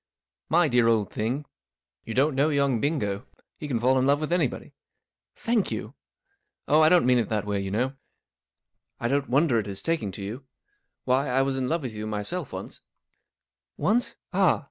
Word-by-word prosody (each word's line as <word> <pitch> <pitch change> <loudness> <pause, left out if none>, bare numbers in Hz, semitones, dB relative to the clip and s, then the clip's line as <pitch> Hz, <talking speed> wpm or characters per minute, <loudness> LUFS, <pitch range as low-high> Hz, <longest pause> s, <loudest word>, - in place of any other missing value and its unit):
" - - -68
My 170 0 +4
dear 120 -3 +3
old 110 -4 +2
thing, 125 +7 -2 0.6
you 115 - -5
don't 140 +4 +3
know 140 +3 +2
young 140 -6 +1
Bingo* 110 -8 -1 0.3
He 150 - -5
can 125 -5 -1
fall 130 +3 +3
in 130 - +1
love 140 +1 +3
with 155 +1 -3
anybody/* 165 -8 -1 0.4
" - - -65
Thank 230 -3 +2
you! - - -5 0.2
" 400 +1 -47
#< - - -56
Oh, 155 +2 +5
I 155 - +6
didn't 175 -4 +5
mean 125 -1 +4
it 115 - -1
that 105 -2 -1
way, 100 -1 -1
you 100 0 -3
know* 125 +7 -1 1.1
I 120 - -1
don't 140 +2 0
wonder 135 -2 +3
at 105 - -3
^ - - -9
his 100 -1 -4
taking 165 -12 -1
to 100 - -7
you. 115 +7 -6 0.6
Why, 130 +2 +2
1 135 +1 +2
was 135 -1 -1
in 130 -1 -1
love 165 -1 -1
with 125 -4 -4
you 105 0 -5
myself 115 - -3
once," 95 0 -7 1.0
"Once? 235 +4 +1 0.2
Ah! 190 0 +3
130 Hz, 210 wpm, -26 LUFS, 110-155 Hz, 1.1 s, I